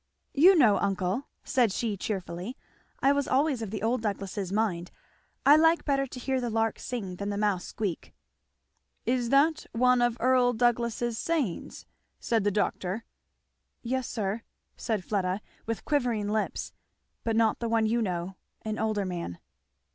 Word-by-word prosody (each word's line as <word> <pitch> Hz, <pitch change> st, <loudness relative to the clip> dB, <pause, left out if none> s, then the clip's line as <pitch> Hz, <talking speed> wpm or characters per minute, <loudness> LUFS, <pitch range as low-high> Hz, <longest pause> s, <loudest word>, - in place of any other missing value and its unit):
"You 355 Hz, +7 st, +7 dB
know, 225 Hz, -9 st, +5 dB
uncle," 195 Hz, +5 st, -1 dB, 0.2 s
said 245 Hz, -6 st, +2 dB
she 215 Hz, +1 st, -1 dB
cheerfully, 190 Hz, -, -4 dB, 0.4 s
"I 275 Hz, -, +5 dB
was 285 Hz, -1 st, +1 dB
always 270 Hz, -2 st, +2 dB
of 220 Hz, -, -4 dB
the 215 Hz, +1 st, -5 dB
old 230 Hz, +2 st, +1 dB
Douglasses' 200 Hz, -2 st, -3 dB
mind 195 Hz, -5 st, 0 dB, 0.6 s
I 285 Hz, -, +9 dB
like 325 Hz, +2 st, +4 dB
better 275 Hz, -2 st, +1 dB
to 250 Hz, -, -8 dB
hear 260 Hz, +1 st, -1 dB
the 240 Hz, -, -1 dB
lark 225 Hz, 0 st, 0 dB
sing 195 Hz, -8 st, -5 dB
than 200 Hz, +1 st, -3 dB
the 200 Hz, -, -2 dB
mouse 205 Hz, -4 st, 0 dB
squeak." 200 Hz, -6 st, -4 dB, 0.9 s
"Is 245 Hz, -1 st, +1 dB
that 300 Hz, +4 st, +3 dB
one 250 Hz, +1 st, +4 dB
of 240 Hz, -1 st, +2 dB
Earl 250 Hz, 0 st, +4 dB
Douglass's 240 Hz, 0 st, 0 dB
sayings?" 295 Hz, -, -2 dB, 0.3 s
said 225 Hz, -3 st, +1 dB
the 205 Hz, -, +3 dB
doctor. 205 Hz, 0 st, -1 dB, 0.8 s
"Yes 255 Hz, +1 st, -2 dB
sir," 210 Hz, +1 st, -2 dB, 0.3 s
said 220 Hz, -5 st, -2 dB
Fleda 190 Hz, -2 st, 0 dB, 0.3 s
with 230 Hz, -1 st, -3 dB
quivering 240 Hz, -8 st, 0 dB
lips, 215 Hz, 0 st, -2 dB, 0.5 s
"but 225 Hz, -1 st, 0 dB
not 225 Hz, -1 st, +3 dB
the 235 Hz, -, -2 dB
one 225 Hz, -1 st, +2 dB
you 230 Hz, +2 st, +1 dB
know 185 Hz, -2 st, -3 dB, 0.3 s
an 215 Hz, 0 st, -3 dB
older 215 Hz, -2 st, 0 dB
man." 170 Hz, -, -4 dB
225 Hz, 155 wpm, -28 LUFS, 200-250 Hz, 0.9 s, I